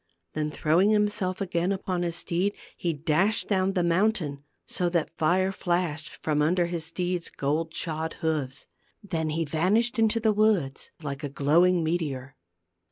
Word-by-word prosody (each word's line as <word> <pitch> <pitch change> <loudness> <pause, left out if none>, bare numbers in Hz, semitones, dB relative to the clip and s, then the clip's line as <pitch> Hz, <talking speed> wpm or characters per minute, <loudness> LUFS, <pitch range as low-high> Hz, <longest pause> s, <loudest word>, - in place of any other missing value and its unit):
Then 150 0 -1
throwing 160 +6 +2
himself 205 -3 +1
again 175 -1 0
upon 185 -2 -2
his 170 -1 -1
steed, 185 +4 0 0.2
he 170 - -1
dashed 165 +8 +1
down 190 -1 +1
the 180 - +1
mountain, 170 -5 +1 0.2
so 175 -1 -1
that 170 -3 -1
fire 185 +4 +2
flashed 175 -4 -1
from 150 -1 +1
under 175 +4 +3
his 170 -2 -3
steed's 175 +1 -2
gold 155 +4 -1
shod 160 -1 -2
hoofs. 145 -4 -2 0.4
Then 160 -5 -2
he 160 +2 -1
vanished 205 - +1
into 225 0 +3
the 220 -1 +2
woods 200 -11 +1
like 140 0 -5
a 145 - -2
glowing 165 +6 +3
meteor. 145 -5 -2
170 Hz, 155 wpm, -27 LUFS, 155-185 Hz, 0.4 s, under